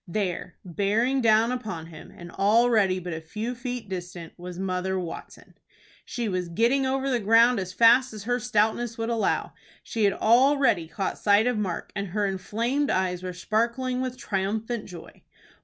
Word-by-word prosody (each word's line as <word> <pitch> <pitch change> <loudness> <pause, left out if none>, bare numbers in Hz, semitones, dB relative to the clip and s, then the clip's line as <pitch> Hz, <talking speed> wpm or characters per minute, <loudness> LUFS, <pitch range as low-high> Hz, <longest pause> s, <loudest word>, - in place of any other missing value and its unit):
There, 180 -1 -3
bearing 210 +9 0
down 225 +1 +4
upon 205 -10 -5
him, 165 -2 -12
and 175 0 -12
already 210 -1 +3
but 180 -1 -5
a 160 - -5
few 215 +9 -5
feet 245 -2 -5
distant, 180 -3 -7
was 180 0 -9
Mother 190 0 -2
Watson! 175 -2 -9 0.5
She 235 -2 -3
was 180 -3 -2
getting 240 +9 +2
over 270 +1 -1
the 250 -3 +1
ground 225 +2 +4
as 185 -1 -4
fast 235 +6 +5
as 215 -2 -8
her 245 +3 0
stoutness 230 +1 0
would 225 0 -2
allow. 230 -2 0 0.3
She 220 -2 -1
had 200 - +3
already 255 - +3
caught 190 +4 -4
sight 205 +1 +4
of 245 -3 0
Mark, 185 -5 -3
and 200 -1 -3
her 205 +3 -1
inflamed 230 +9 -1
eyes 180 -1 0
were 185 0 -4
sparkling 235 +7 -1
with 255 -1 -4
triumphant 215 +3 -2
joy. 175 -3 -12
215 Hz, 170 wpm, -26 LUFS, 185-240 Hz, 0.5 s, fast